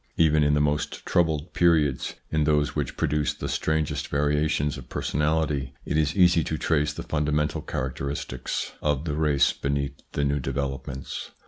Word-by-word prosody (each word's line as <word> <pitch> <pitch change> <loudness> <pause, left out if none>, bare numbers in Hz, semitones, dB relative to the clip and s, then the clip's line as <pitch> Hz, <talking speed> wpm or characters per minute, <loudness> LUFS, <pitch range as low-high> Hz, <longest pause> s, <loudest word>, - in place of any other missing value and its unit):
Even 75 -2 +4
in 75 0 +3
the - - +2
most 75 0 -1
troubled 80 -1 +1
periods, 80 -6 +2 0.2
in 80 -1 +2
those 75 -1 +2
which 70 -4 -2
produce 75 0 0
the - - -4
strangest 80 -1 -1
variations 75 0 +1
of 65 -3 -10
personality, 75 -2 0
it - - -2
is 75 -1 +2
easy 85 -3 +5
to 80 - -2
trace 75 -1 +1
the - - -6
fundamental 75 -1 0
characteristics 65 -1 -3
of 75 0 0
the 75 - -1
race 75 -2 +3
beneath 70 -1 -2
the 70 - 0
new 70 +1 +1
developments. 65 0 -4
75 Hz, 155 wpm, -26 LUFS, 70-75 Hz, 0.2 s, easy